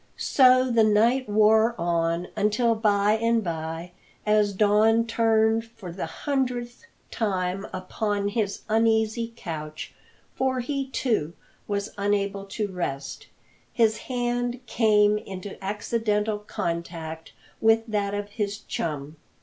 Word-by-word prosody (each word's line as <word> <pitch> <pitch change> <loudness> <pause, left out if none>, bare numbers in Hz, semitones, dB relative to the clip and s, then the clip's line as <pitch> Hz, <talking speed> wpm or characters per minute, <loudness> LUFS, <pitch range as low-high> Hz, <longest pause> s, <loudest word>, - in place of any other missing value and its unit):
So 255 -1 +4
the 230 -1 +4
night 225 +4 +3
wore 220 +2 +4
on, 170 0 0
until 215 +3 +2
by 210 -2 +2
and 230 -1 +2
by, 165 0 -4 0.3
as 210 -1 +3
Don 215 +3 +3
turned 225 -1 +2
for 225 -6 -10
the 185 - -4
hundredth 250 - -3 0.2
time 190 -3 -1
upon 200 +2 -2
his 205 -2 -2
uneasy 225 +1 +1
couch 155 -6 -6 0.4
for 260 -1 0
he, 275 +1 -3
too, 220 - -1 0.3
was 200 0 -3
unable 200 -1 0
to 205 +1 -3
rest 140 -7 -5 0.4
his 220 -2 +2
hand 245 0 -1
came 210 -3 +3
into 195 0 -8
accidental 210 +1 -1
contact 170 -4 -5 0.3
with 225 0 +4
that 205 -3 -1
of 205 0 -4
his 205 -1 -3
chum. 150 -6 -5
210 Hz, 115 wpm, -25 LUFS, 195-230 Hz, 0.4 s, So